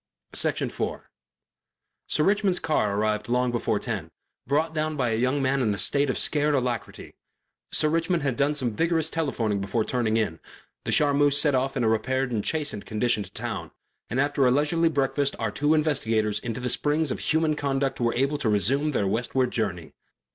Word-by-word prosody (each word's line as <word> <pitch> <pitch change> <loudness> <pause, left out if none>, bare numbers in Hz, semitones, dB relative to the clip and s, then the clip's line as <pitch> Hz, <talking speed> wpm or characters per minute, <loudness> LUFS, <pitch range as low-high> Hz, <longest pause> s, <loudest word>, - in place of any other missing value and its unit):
Section - - 0
4 - - -5 1.0
Sir 150 - +1
Richmond's 195 0 +2
car 105 -11 0
arrived 105 +1 -1
long 125 0 +1
before 120 - 0
ten, - - -4 0.4
brought 155 +4 +1
down 155 0 -2
by 125 -3 +1
a - - +1
young 130 +4 +1
man 135 +1 +1
in 110 -4 +1
a - - -7
state 140 +6 +2
of - - -1
scared 150 0 +2
alacrity 125 -4 -3 0.6
Sir 155 - +3
Richmond 165 +1 0
had 135 -4 0
done 145 +4 +1
some 125 -6 -2
vigorous 165 +1 +1
telephoning 115 -10 -1
before 110 +3 -1
turning 115 -3 0
in, 100 -8 -1 0.5
the - - -1
Charmeuse 145 -1 +3
set 150 -2 +3
off 135 +1 0
in 125 - 0
a - - +2
repaired 130 +4 0
and 110 -3 -1
chastened 150 -10 -2
condition 110 0 +1
to 95 -1 -8
town, - - -4 0.4
and 125 - -1
after 140 -1 +2
a - - +5
leisurely 150 +5 +2
breakfast 140 -1 0
our 110 -2 -2
two 145 +8 +2
investigators 115 -9 0
into 120 0 -5
the 125 -1 -1
springs 150 +1 0
of - - -3
human 160 -1 +1
conduct 135 -2 -1
were 115 -1 +1
able 140 +3 0
to 120 - 0
resume 135 - +1
their 100 - +1
westward 125 +5 0
journey. 90 -8 -3
135 Hz, 190 wpm, -25 LUFS, 115-150 Hz, 1.0 s, a